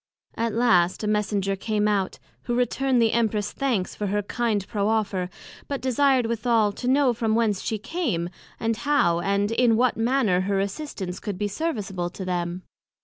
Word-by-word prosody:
At 230 -1 -2
last 190 -6 +3
a - - -1
Messenger 205 -2 0
came 210 +1 0
out, 200 -3 0 0.3
who 240 - -1
returned 250 +1 +1
the 225 -1 +4
Empress 215 -3 0
thanks 240 -9 -1
for 205 - -3
her 205 +1 0
kind 215 -2 -1
proffer, 205 -3 0 0.4
but 280 -1 -3
desired 260 0 +2
withal, 230 -2 +2
to 245 +5 -6
know 265 -1 +4
from 220 -1 0
whence 215 -4 +1
she 220 - -2
came, 210 - -2 0.3
and 225 -1 0
how, 240 -10 +2
and 200 +3 0
in 230 -1 +3
what 250 0 +2
manner 225 -6 +2
her 195 +1 0
assistance 195 -3 -4
could 205 -4 -4
be 205 +1 -1
serviceable 200 - -3
to 185 +1 -7
them? 175 0 -2
215 Hz, 170 wpm, -25 LUFS, 195-240 Hz, 0.4 s, the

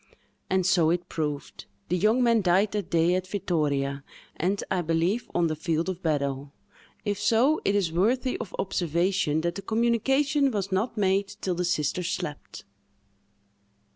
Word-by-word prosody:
And 190 -1 +1
so 175 -4 +4
it 175 +1 -1
proved: 150 -3 -4 0.2
the 180 - +1
young 215 +7 +3
man 230 -2 +4
died 190 +3 +3
that 205 -4 -3
day 170 +1 +3
at 185 0 -1
Vittoria, 145 -8 -1 0.3
and, 190 +4 -1
I 185 -2 +1
believe, 170 +7 0
on 175 - +3
the 155 -1 0
field 165 +2 -1
of 185 -1 -5
battle. 140 -3 -2 0.5
If 205 -1 -1
so, 230 +9 +3
it 200 - +1
is 190 -5 +1
worthy 250 +9 +1
of 210 -5 -6
observation 175 -3 0
that 170 +1 -1
the 200 - -6
communication 270 +6 +2
was 200 -5 -3
not 220 +5 -1
made 195 0 +2
till 195 -3 -4
the 180 +1 -1
sisters 170 +1 -1
slept. 145 -1 -5
185 Hz, 160 wpm, -26 LUFS, 165-210 Hz, 0.5 s, so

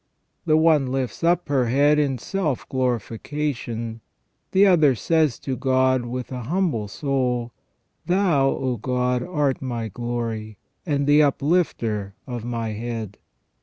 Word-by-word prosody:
The 155 0 +5
one 155 -4 +4
lifts 135 +3 -3
up 175 +1 +2
her 135 -4 +1
head 145 +5 +4
in 140 -3 +1
self 155 - -2
glorification; 120 -2 -3 0.5
the 195 +2 +5
other 155 -8 +5
says 155 +1 +1
to 135 - -3
God 130 -1 +2
with 125 +1 -5
an 125 -2 -5
humble 155 - 0
soul, 125 -1 -1 0.3
" - - -48
Thou, 175 -7 +3
O 130 -3 -1
God, 125 +2 0
art 150 -4 -1
my 120 -4 -3
glory, 115 -1 -4 0.3
and 140 -2 +1
the 145 +1 +5
uplifter 135 - 0
of 120 -4 -5
my 115 -1 -3
head 110 -2 -5
130 Hz, 135 wpm, -23 LUFS, 120-150 Hz, 0.5 s, The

